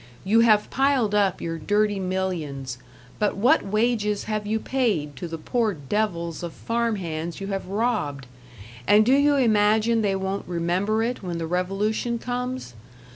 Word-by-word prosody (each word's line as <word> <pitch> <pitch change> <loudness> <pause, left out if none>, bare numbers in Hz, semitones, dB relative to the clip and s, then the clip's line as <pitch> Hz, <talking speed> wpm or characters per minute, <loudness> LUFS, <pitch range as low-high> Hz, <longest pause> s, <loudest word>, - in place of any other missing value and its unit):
You 215 +4 +3
have 215 -2 +4
piled 270 -6 +2
up 200 -3 +2
your 165 -1 -3
dirty 205 +4 +1
millions, 165 -9 -3 0.4
but 210 -2 0
what 235 +6 +4
wages 215 0 0
have 215 -1 -3
you 220 +1 0
paid 210 - -1
to 175 - -5
the 165 0 -5
poor 220 +5 0
devils 170 +1 -2
of 170 -2 -5
farm 230 -1 -1
hands 170 -2 -4
you 195 - -5
have 195 -2 -3
robbed? 195 - -1 0.6
And 210 +5 +6
do 255 - +4
you 285 +1 +4
imagine 220 -2 +3
they 200 -2 +1
won't 190 +1 -3
remember 180 +6 0
it 245 +2 -2
when 175 -3 -4
the 165 - -3
revolution 195 +7 -1
comes? 250 - -4
205 Hz, 160 wpm, -24 LUFS, 175-225 Hz, 0.6 s, And